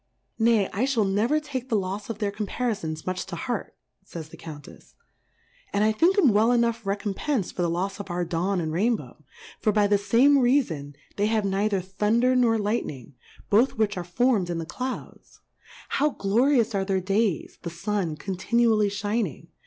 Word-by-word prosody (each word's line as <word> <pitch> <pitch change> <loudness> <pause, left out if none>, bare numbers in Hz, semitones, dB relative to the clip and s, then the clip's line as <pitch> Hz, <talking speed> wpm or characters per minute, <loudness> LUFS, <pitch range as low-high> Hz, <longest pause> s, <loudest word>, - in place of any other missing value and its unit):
Nay, 225 -3 +3
I 220 +7 +1
fliall 235 -7 +1
never 220 +10 +2
take 265 -4 -6
the 220 - +2
lofs 195 +2 -4
of 230 - -4
their 205 -1 -1
Comparifons 205 -6 -3
much 185 0 -2
to 190 - -5
Heart, 240 +5 -4 0.3
fays 165 -5 -8
the - - -12
Cotmttfs; 150 -3 -12 0.8
and 200 - +1
Ithink'cmwell 245 - +4
enough 235 -1 +1
recompenc'd 200 +4 -1
for - - -2
the 170 - +1
Lofs 190 +4 -2
of 200 - -7
our 175 0 -1
Dawn, 175 +3 -1
and 160 -2 -2
Rainbow; 220 +6 -1 0.4
for 215 - +2
by 210 0 +3
the 205 0 +3
fame 255 +8 +4
Reafon, 195 - +1 0.2
they 205 +1 +2
have 215 -2 +1
neither 195 0 0
Thunder 215 +7 +1
nor 235 -3 +3
Light 215 +2 -1
ning, 130 -1 -9 0.4
both 225 +6 +3
which 215 -2 +1
are 180 - -3
formM 200 +1 +1
in 170 - -2
the 165 - -4
Clouds; 255 +10 -7 0.5
how 295 +2 +2
glorious 235 +1 +2
are 195 -1 0
their 190 -1 0
Days, 195 0 -1
the 170 - -5
Sun 175 -1 -2
continually 215 +4 +1
fliining? 205 - -3
205 Hz, 170 wpm, -25 LUFS, 185-235 Hz, 0.8 s, Ithink'cmwell